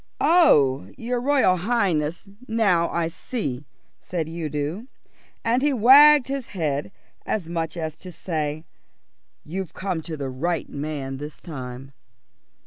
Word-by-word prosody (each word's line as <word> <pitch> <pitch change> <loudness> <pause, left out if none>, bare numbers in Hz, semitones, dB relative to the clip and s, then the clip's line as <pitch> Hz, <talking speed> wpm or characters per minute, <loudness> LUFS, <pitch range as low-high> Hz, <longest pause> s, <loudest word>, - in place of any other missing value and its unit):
"Oh, 145 - +4
your 240 +1 -2
Royal 260 -9 +3
Highness, 175 -5 0 0.2
now 200 -7 +2
I 170 -1 -1
see," 160 - -5 0.3
said 165 -4 -4
Udo, 160 - -4 0.6
and 240 +3 +2
he 290 0 +2
wagged 275 +4 +7
his 275 -2 -4
head 155 -3 -2 0.3
as 200 -7 -2
much 165 -1 -3
as 160 -2 -4
to 185 - -10
say, 155 -2 -3 0.8
"You've 185 +2 -6
come 185 -4 -3
to 160 0 -6
the 135 -2 -4
right 165 +5 -2
man 140 -2 -5
this 150 +2 -8
time." 130 -3 -8
170 Hz, 130 wpm, -24 LUFS, 150-225 Hz, 0.8 s, wagged